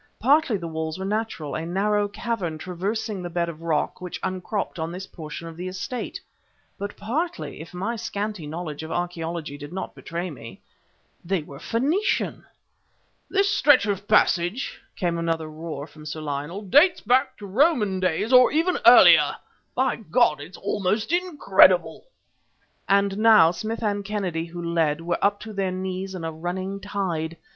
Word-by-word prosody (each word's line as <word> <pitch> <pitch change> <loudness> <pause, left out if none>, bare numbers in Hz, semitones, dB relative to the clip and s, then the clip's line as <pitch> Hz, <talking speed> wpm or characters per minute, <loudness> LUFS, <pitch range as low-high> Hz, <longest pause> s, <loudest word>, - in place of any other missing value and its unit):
Partly 270 -2 +3
the 170 -3 -6
walls 160 0 -4
were 190 - -4
natural, 210 -8 -3
a 160 - -3
narrow 205 +4 +1
cavern 205 -6 -3
traversing 195 +4 -3
the 175 - -5
bed 170 0 -1
of 165 -1 -9
rock 165 0 -1
which 180 -1 -6
upcropped 185 0 -3
on 160 +1 -3
this 185 +2 -6
portion 165 -1 -8
of 165 - -9
the 180 +2 -5
estate, 205 +7 -5 0.6
but 200 +1 -5
partly, 305 - -3
if 160 - -10
my 195 +7 -3
scanty 210 -6 -4
knowledge 155 -1 -5
of 160 - -7
archaeology 170 -4 -3
did 145 +1 -8
not 190 +1 -5
betray 170 +1 -5
me, 115 -7 -10 0.6
they 180 -2 -1
were 140 -2 -11
Phoenician! 285 - 0 0.9
"This 395 0 +2
stretch 290 - +5
of 200 -1 -2
passage," 175 +9 +2
came 175 -4 -1
another 165 -1 -1
roar 155 -2 -6
from 155 -1 -13
Sir 155 +1 -5
Lionel, 150 +7 -4
"dates 295 - +5
back 260 +3 +2
to 205 - -9
Roman 210 - +2
days 185 +6 0
or 250 0 +7
even 330 +4 +1
earlier! - - +8 0.4
By 260 0 +1
God! 155 -7 +2
It's 165 +6 -10
almost 205 - -1
incredible!" 195 - +4 0.8
And 200 0 +2
now 215 -7 +7
Smith 220 +6 -4
and 205 -1 0
Kennedy, 190 -5 -2
who 175 +1 -7
lid, 165 -2 +1
were 170 +1 -2
up 205 0 +2
to 220 -1 -8
their 195 -2 -1
knees 185 +1 -4
in 175 - -6
a 165 - -2
running 185 +4 -4
tide. 180 -5 -3
185 Hz, 165 wpm, -24 LUFS, 165-210 Hz, 0.9 s, earlier